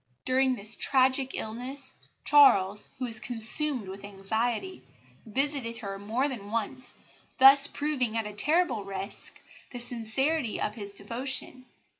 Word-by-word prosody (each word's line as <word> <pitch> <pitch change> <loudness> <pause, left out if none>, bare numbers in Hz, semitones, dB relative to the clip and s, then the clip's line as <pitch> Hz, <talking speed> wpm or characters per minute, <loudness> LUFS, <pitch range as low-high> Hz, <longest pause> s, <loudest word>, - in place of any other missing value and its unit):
During 260 0 +2
this 215 -1 +3
tragic 265 0 +1
illness 260 +5 -3 0.3
Charles, 210 -9 +4
who 255 - -4
was 230 -2 +2
consumed 245 +1 +3
with 195 +1 -10
anxiety, 220 - -3 0.5
visited 265 -1 -2
her 200 -4 -7
more 225 +7 -2
than 220 -8 -7
once, 230 +4 -1 0.4
thus 275 +2 +7
proving, 265 -8 -3
at 225 - -2
a 210 - -7
terrible 290 - +1
risk, 195 +1 -4 0.3
the 250 - -8
sincerity 245 +3 -1
of 210 - -3
his 205 -3 -3
devotion. 255 +5 -2
240 Hz, 130 wpm, -27 LUFS, 210-270 Hz, 0.5 s, thus